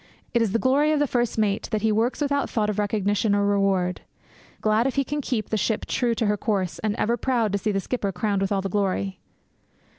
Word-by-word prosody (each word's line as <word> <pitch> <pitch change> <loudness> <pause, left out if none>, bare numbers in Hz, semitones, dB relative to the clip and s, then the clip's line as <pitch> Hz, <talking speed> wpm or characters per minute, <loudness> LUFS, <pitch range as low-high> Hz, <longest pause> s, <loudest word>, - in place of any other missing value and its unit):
It 235 - +3
is 225 -4 +1
the 230 - +2
glory 275 +5 +3
of 305 - +2
the 290 - +2
first 240 -4 -1
mate 210 -2 0
that 215 -1 -1
he 220 - +3
works 230 +7 0
without 285 -1 0
thought 210 -2 0
of 210 - -4
recognition 205 0 +1
or 200 0 +2
reward; 195 -3 +1 0.6
glad 215 +3 +2
if 270 - -2
he 275 - +2
can 295 +3 -3
keep 245 -5 -2
the 220 - 0
ship 215 +2 -1
true 240 -2 0
to 225 - 0
her 210 0 +1
course; 195 -5 -1
and 215 -1 -1
ever 235 +1 0
proud 235 -4 0
to 200 - 0
see 215 - 0
the 195 - 0
skipper 200 -1 -2
crowned 200 +1 -1
with 195 - -1
all 195 -1 +1
the - - -1
glory. 195 0 -1
215 Hz, 240 wpm, -24 LUFS, 200-240 Hz, 0.6 s, It